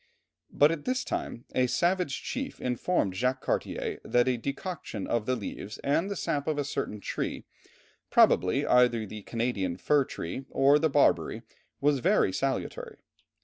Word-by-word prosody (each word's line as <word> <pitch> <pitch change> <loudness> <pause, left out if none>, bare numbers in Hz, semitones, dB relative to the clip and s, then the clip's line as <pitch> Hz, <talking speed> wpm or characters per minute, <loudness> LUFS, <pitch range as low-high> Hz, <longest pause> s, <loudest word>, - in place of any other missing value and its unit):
But 145 +2 +5
at 160 -3 -4
this 255 0 0
time 120 - -4
a 130 0 +2
savage 175 +1 0
chief 270 +1 -4
informed 125 - 0
Jacques 125 +6 0
Cartier - - -2
that 120 +1 +2
a 130 - +2
decoction 140 - -5
of 115 -2 -1
the 130 - +2
leaves 105 0 -6
and 175 +8 0
sap 145 -3 -2
of 155 -2 0
a 145 - +1
certain 105 -6 -3
tree, - - -4 0.6
probably 115 +11 +4
either 120 -3 +4
the 105 +1 -8
Canadian 100 -6 -2
fir 145 +5 +2
tree 130 +8 -6
or 140 +2 +4
the 160 +1 +2
barberry, 135 -5 +2 0.4
was 145 -1 +3
very 95 -5 +3
salutary. 135 +3 -3
130 Hz, 150 wpm, -28 LUFS, 115-145 Hz, 0.6 s, But